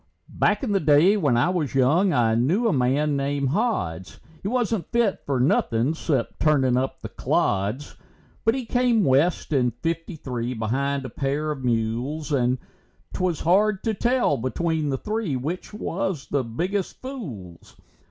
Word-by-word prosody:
Back - - +1
in 240 - -1
the 195 - +3
day 155 +5 +5
when 145 - +2
I 150 +9 +3
was 160 -8 -2
young, 155 +9 +3
I 115 -6 +2
knew 160 - +2
a 220 - +2
man 140 +3 +1
named 140 0 -1
Hods; 95 - -2 0.2
He - - -4
wasn't 230 -4 -1
fit 235 -4 +1
fer 140 -2 +1
nothin' 125 +1 +2
'cep 145 -6 -2
turnin' 135 -5 +3
up 130 +1 -2
the - - -5
clods. 105 +9 -1 0.5
But 225 +2 +3
he 260 -2 -3
came 245 -2 +2
west 150 +3 +2
in 125 -3 +3
fifty 165 - -4
three, 125 -4 -4
behind 135 +5 -1
a - - -5
pair 145 +3 -2
of 135 -3 -6
mules, 125 +6 -1
And 125 -2 +2 0.6
'twas 180 -4 -1
hard 195 +4 +2
to 225 - 0
tell 240 - +1
between 155 +5 -1
the 135 - 0
three 210 - -2
which 155 +8 -4
was 195 -6 -3
the 140 -2 0
biggest 180 - -3
fools. 125 - -8
145 Hz, 160 wpm, -24 LUFS, 125-190 Hz, 0.6 s, day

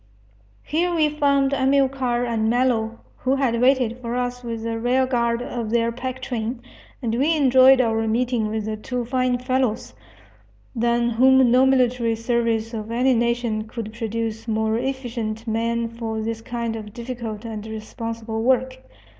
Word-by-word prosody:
Here 345 +4 0
we 310 -2 +3
found 280 -2 +2
Amilcar 265 -2 +1
and 225 -2 0
Mello, 235 -2 +1 0.2
who 260 +1 0
had 245 -4 0
waited 250 -2 +2
for 235 0 -3
us 245 0 -2
with 230 -2 -5
the 225 0 -2
rear 250 +3 +2
guard 235 -2 0
of 235 -3 -4
their 230 0 +1
pack 255 +2 -5
train, 235 0 -3 0.4
and 225 -2 -1
we 285 +7 +2
enjoyed 260 -1 +6
our 225 -2 +1
meeting 235 0 0
with 215 0 -3
the 215 0 -2
two 245 +2 -4
fine 255 0 +1
fellows, 255 - -1 0.8
than 235 +1 +1
whom 260 +1 +5
no 255 +2 +5
military 250 -3 +2
service 230 -1 -1
of 215 -1 -5
any 250 +3 +2
nation 235 -2 0
could 220 -1 -6
produce 225 0 -4
more 220 0 0
efficient 240 -4 -4
men 230 +1 -1
for 225 -1 -5
this 225 +1 -3
kind 235 -1 -3
of 210 -2 -8
difficult 235 -3 -6
and 220 -1 -6
responsible 220 0 -5
work. 260 +1 +1
235 Hz, 155 wpm, -23 LUFS, 225-255 Hz, 0.8 s, enjoyed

